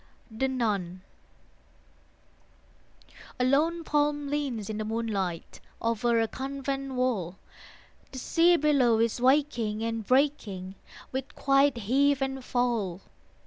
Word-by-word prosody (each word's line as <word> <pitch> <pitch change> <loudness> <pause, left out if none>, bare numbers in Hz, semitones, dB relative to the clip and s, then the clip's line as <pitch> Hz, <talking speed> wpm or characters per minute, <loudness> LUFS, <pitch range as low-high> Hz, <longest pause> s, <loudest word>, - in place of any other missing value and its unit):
THE 230 +5 -1
NUN 200 -8 -2 2.4
A 250 - +2
lone 320 +6 +2
palm 295 -1 0
leans 275 -8 -2
in 215 -1 -4
the - - -1
moonlight 210 -6 -3 0.2
Over 230 +1 +1
a 225 - +2
convent 275 +1 -4
wall. 210 -9 -1 0.7
The 265 - -8
sea 340 +6 +3
below 275 -7 +3
is 230 +1 0
waking 250 -5 +2
and 225 -1 -2
breaking 215 -8 0 0.4
With 265 +2 -5
quiet 275 -1 +3
heave 270 +6 +2
and 265 -1 -4
fall. 235 -8 -1
250 Hz, 110 wpm, -28 LUFS, 220-275 Hz, 2.4 s, sea